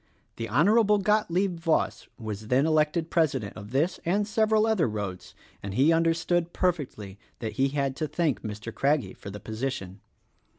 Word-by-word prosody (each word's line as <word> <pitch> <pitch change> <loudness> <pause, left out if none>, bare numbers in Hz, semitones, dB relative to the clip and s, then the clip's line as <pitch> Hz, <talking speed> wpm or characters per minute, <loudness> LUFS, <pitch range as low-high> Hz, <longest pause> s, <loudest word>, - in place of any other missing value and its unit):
The 115 -1 -4
Hon. 115 - +3 0.4
Gotlieb 190 -3 +1
Voss 165 -1 0
was 110 -2 -6
then 130 +5 +3
elected 155 +1 +1
president 135 -11 0
of 105 -1 -9
this 150 +8 0
and 200 +4 +1
several 220 0 +2
other 220 - +2
roads; 100 -4 -5 0.3
and 100 0 -5
he 145 +7 +4
understood 165 +1 +1
perfectly 130 - -2 0.2
that 110 -2 -4
'he 135 - +1
had 140 -1 -1
to 155 - -1
thank 155 -4 0
Mr. 110 +1 -6
Craggie 140 0 +1
for - - -10
the 105 +1 -7
position. 110 -3 -5
140 Hz, 160 wpm, -27 LUFS, 110-170 Hz, 0.4 s, he